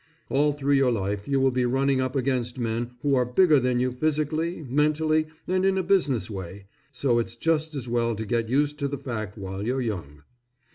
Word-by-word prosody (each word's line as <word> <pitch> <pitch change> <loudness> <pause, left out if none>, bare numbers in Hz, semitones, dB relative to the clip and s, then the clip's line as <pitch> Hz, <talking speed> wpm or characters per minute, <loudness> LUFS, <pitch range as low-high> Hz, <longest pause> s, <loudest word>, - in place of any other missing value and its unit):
All 145 +2 +2
through 140 0 0
your 135 -2 +4
life 100 -2 -2
you 140 -1 +1
will 135 0 +3
be 125 0 0
running 135 +1 +2
up 130 +1 -2
against 125 -2 -1
men 120 0 -2
who 145 -1 +2
are 125 -2 +4
bigger 150 +5 +4
than 125 -1 +1
you 130 +1 +1
physically, 155 +4 -1
mentally, 155 +3 +2 0.2
and 185 +1 +1
in 190 0 +2
a 190 - +1
business 165 - +1
way, 95 -1 -7 0.3
so 125 -2 +1
it's 115 0 -3
just 160 +3 0
as 130 -3 -4
well 115 -1 0
to 110 +1 -4
get 115 0 -1
used 145 +3 +1
to 140 - 0
the 140 0 -4
fact 110 -7 -5
while 95 -1 -5
you're 125 +4 -1
young. 85 - -4
130 Hz, 205 wpm, -25 LUFS, 115-150 Hz, 0.3 s, your